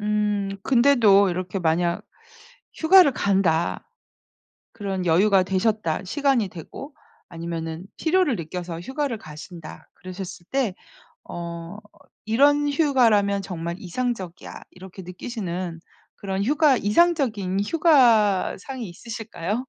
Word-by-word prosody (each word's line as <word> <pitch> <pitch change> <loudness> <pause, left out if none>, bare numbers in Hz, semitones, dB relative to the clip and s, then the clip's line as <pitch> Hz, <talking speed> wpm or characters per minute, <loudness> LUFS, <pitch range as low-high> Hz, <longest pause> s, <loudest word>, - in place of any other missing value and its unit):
음 210 -1 0
근데도 235 -7 +4
이렇게 180 +2 -3
만약 170 0 0 0.7
휴가를 340 -2 +6
간다 185 -7 0 0.8
그런 195 -5 -4
여유가 190 +3 +4
되셨다 190 -2 -1
시간이 270 -1 +1
되고 185 - -10 0.3
아니면은 165 0 -6
필요를 330 -6 +1
느껴서 170 0 -6
휴가를 265 - -3
가신다 155 0 -11
그러셨을 185 -2 -9
때 260 -8 0 0.5
어 170 +2 -7 0.5
'이런 290 +6 +3
휴가라면 235 -9 +2
정말 170 -3 -5
이상적이야.' 190 -2 -5
이렇게 190 +1 -11
느끼시는 180 -2 -5 0.4
그런 195 0 -3
휴가 290 +2 +3
이상적인 215 - +1
휴가 235 - +3
상이 255 -1 -7
있으실까요? 215 +2 -5
200 Hz, 260 characters per minute, -23 LUFS, 180-250 Hz, 0.8 s, 휴가를